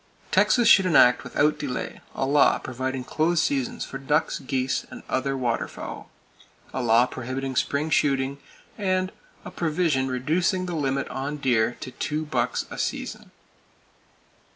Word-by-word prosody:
Texas 240 -2 +4
should 190 -2 +7
enact 125 -7 +5
without 150 +1 +1
delay 130 -4 -4
a 135 - 0
law 140 +1 +4
providing 130 +1 -4
close 160 +5 +1
seasons 250 - -1
for 135 - -7
ducks, 150 +3 0
geese 130 0 -1
and - - -10
other 135 +1 -1
waterfowl; 120 -3 -3 0.6
A 130 - -2
law 120 0 +5
prohibiting 130 +1 -5
spring 145 +4 0
shooting, 140 -1 +1 0.4
and 185 -1 0 0.3
A - - -7
provision 155 -5 0
reducing 165 +8 0
the 180 - -4
limit 140 -3 -1
on 140 +3 -4
deer 120 -4 +1
to 130 - -6
two 155 +4 -3
bucks 125 -4 -1
a - - -6
season. - - -4
135 Hz, 140 wpm, -25 LUFS, 130-160 Hz, 0.6 s, should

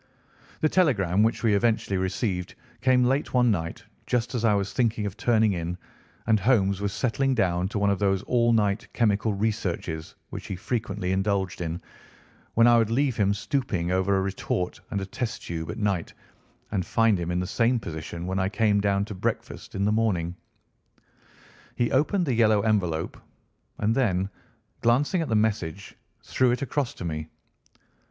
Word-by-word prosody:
The 155 - +4
telegram 105 - +2
which 110 +2 +1
we 110 -2 +3
eventually 110 -1 +1
received 95 -1 -2 0.3
came 130 -1 +4
late 135 +2 0
one 125 -2 +4
night 85 -4 -3 0.2
just 125 +1 0
as 120 -2 -2
I 110 -3 +4
was 100 -1 -1
thinking 115 -4 +1
of 100 -1 -4
turning 110 -3 +2
in 85 0 -3 0.5
and 110 -1 +3
Holmes 100 -3 +2
was 100 -1 -1
settling 130 +5 0
down 90 -5 +1
to 105 - -4
one 100 0 +2
of 100 - -1
those 95 -1 +1
all 120 -1 +2
night 105 -3 +1
chemical 110 -1 +2
researches 90 -6 -2 0.2
which - - -7
he 95 - -3
frequently 105 -2 -2
indulged 95 -1 0
in, 85 0 -3 0.8
when 115 - +6
I 120 0 +6
would 110 -2 +2
leave 130 +1 +1
him 100 -2 +3
stooping 100 -8 -1
over 95 +1 +2
a - - +2
retort 95 -2 -2
and 100 - -2
a - - -3
test 120 +2 -4
tube 80 -1 -5
at - - -5
night 100 -5 -1 0.6
and 95 -3 0
find 115 0 +2
him 85 0 -3
in 90 0 0
the 90 - -1
same 120 +5 +1
position 85 -2 -6
when 95 +1 -1
I 95 +1 +1
came 105 -1 +2
down 100 0 +1
to 105 - -7
breakfast 95 - -4
in 100 +1 0
the 105 - +2
morning. 100 -7 +1 1.4
He 120 - 0
opened 170 +7 +2
the 135 - 0
yellow 110 -3 +4
envelope, 95 -7 0 0.6
and 110 +2 +1
then, 100 -6 +1 0.5
glancing 140 +9 +2
at 160 - -3
the 110 - +1
message, 100 -4 -1 0.3
threw 130 -1 +2
it 125 +3 0
across 140 -1 -2
to - - -7
me. 80 -1 -3
105 Hz, 175 wpm, -26 LUFS, 95-115 Hz, 1.4 s, when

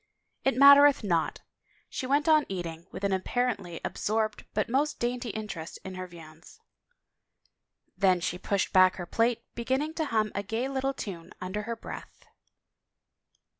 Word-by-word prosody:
" - - -49
It 270 - +3
mattereth 280 -1 +8
not." 170 -5 0 0.5
She 255 - -5
went 285 +3 +2
on 310 -2 +5
eating, 170 -2 -5
with 190 - -8
an 200 -1 +1
ap 190 - 0
parently 200 -8 -2
absorbed 215 0 -1
but 210 - +1
most 290 +5 0
dainty 245 0 -2
interest 200 -7 -6
in 190 - -6
her 185 0 -6
viands. 165 - -14 1.4
Then 185 -3 +3
she 180 +1 -3
pushed 200 0 -1
back 185 0 +6
her 175 - -6
plate, 230 +5 +1
beginning 265 +6 -1
to 320 -1 -1
hum 215 -5 0
a 200 - -1
gay 225 +6 -2
little 270 0 -1
time 175 -9 -7
under 185 +3 -4
her 230 - -1
breath. 225 - -10
215 Hz, 160 wpm, -28 LUFS, 185-260 Hz, 1.4 s, mattereth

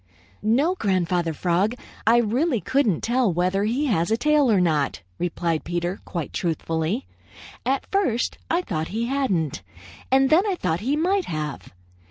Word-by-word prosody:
"No, 270 +11 +2
Grandfather 180 - 0
Frog. 180 +8 0 0.3
I 230 +1 +6
really 240 +4 +1
couldn't 250 - +1
tell 240 -3 +2
whether 185 +4 +1
he 250 +7 0
has 185 - +1
a 225 - +2
tail 300 -2 +3
or 200 - +4
not," 150 - 0 0.2
replied 170 -2 -1
Peter 175 +2 -2
quite 170 -5 -5
truthfully. 165 - -1 0.6
"At 270 +1 +1
first 355 - 0
I 345 +2 +1
thought 160 - -3
he 225 +4 -2
hadn't, 200 - -1 0.5
and 265 0 +4
then 320 +4 +7
I 390 - +1
thought 165 - -1
he 265 +7 0
might 370 +5 +1
have. 150 -3 -5
210 Hz, 155 wpm, -24 LUFS, 170-270 Hz, 0.6 s, then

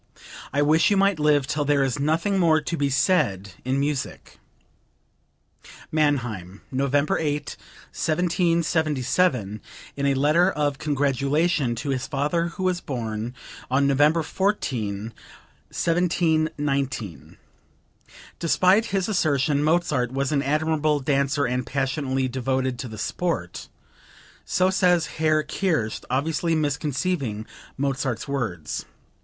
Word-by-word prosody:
I 145 +2 +2
wish 155 +2 +4
you 205 - +2
might 195 -3 +3
live 150 -2 +3
till 150 +1 -1
there 145 -1 +2
is 135 +1 -1
nothing 165 +7 +1
more 160 -3 +4
to 155 +3 -3
be 145 -3 0
said 100 - +1
in 130 +2 0
music." 140 -1 -3 1.5
(Mannheim, 120 - -1
November 140 +2 +1
8, 150 -2 -2 0.4
1777, 160 - +1 0.3
in 140 - -2
a 140 - +2
letter 155 +7 +4
of 145 -5 -1
congratulation 140 0 +1
to 140 +4 -3
his 130 -1 -2
father 150 +4 0
who 175 +2 -6
was 180 -1 0
born 115 -2 -4 0.3
on 135 +2 +2
November 145 +4 +3
14, 115 - -2 0.6
1719. 155 - -1 1.0
Despite 185 +5 +3
his 195 -4 -1
assertion 145 -7 +1
Mozart 150 -6 +1
was 135 +1 -1
an 145 -2 +2
admirable 155 +1 +1
dancer 140 +1 +1
and 125 +1 -1
passionately 135 0 -1
devoted 130 0 -1
to 130 - -4
the 110 -2 -9
sport. - - -3 0.8
[So 185 +1 +2
says 180 -3 +3 0.2
Herr 155 -1 +3
Kerst 155 - -1
obviously 160 +5 0
misconceiving 145 - -1 0.3
Mozart's 135 -2 -2
words. 115 - -3
145 Hz, 115 wpm, -24 LUFS, 130-160 Hz, 1.5 s, wish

